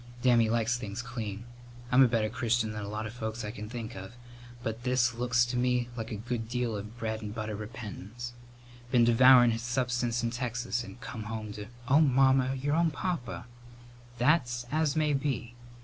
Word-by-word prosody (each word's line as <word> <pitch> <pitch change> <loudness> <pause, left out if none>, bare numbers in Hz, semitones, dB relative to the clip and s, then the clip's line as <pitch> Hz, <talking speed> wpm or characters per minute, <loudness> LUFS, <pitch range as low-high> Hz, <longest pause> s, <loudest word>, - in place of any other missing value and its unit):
Dammy 120 -3 +5
likes 115 +1 +1
things 105 +1 -5
clean. 115 -3 -5 0.5
I'm 125 +2 +6
a 130 - +8
better 115 -2 +1
Christian 115 -1 0
than 105 0 -5
a 100 - -5
lot 105 +1 -3
of 105 - -6
folks 110 -1 -4
I 105 - -4
can 105 -2 -8
think 115 -2 -6
of, 95 +3 -8 0.5
but 115 +1 -3
this 125 -1 +2
looks 120 0 +2
to 120 +1 -3
me 125 -1 +1
like 115 -1 -5
a - - -2
good 115 +1 -4
deal 125 -2 -1
of 100 0 -4
a - - -13
bread 110 -1 -4
and 105 0 -6
butter 110 -2 -3
repentance. 110 +1 -7 0.6
Been 120 -1 +4
devourin' 120 +1 +7
his 115 0 -2
substance 120 -1 0
in 115 - 0
Texas 120 0 -2
and 125 - -11
come 110 -5 -6
home 110 -1 -5
to 105 0 -7
" 120 - -18
"Oh, 140 +4 +5
Mamma, 135 -2 +4
your 140 +2 -1
own 170 0 +3
papa!" 150 -7 -3 0.7
"That's 120 -2 +2
as 155 -1 +1
may 155 -1 +2
be. 135 -4 -2
120 Hz, 195 wpm, -30 LUFS, 110-125 Hz, 0.7 s, a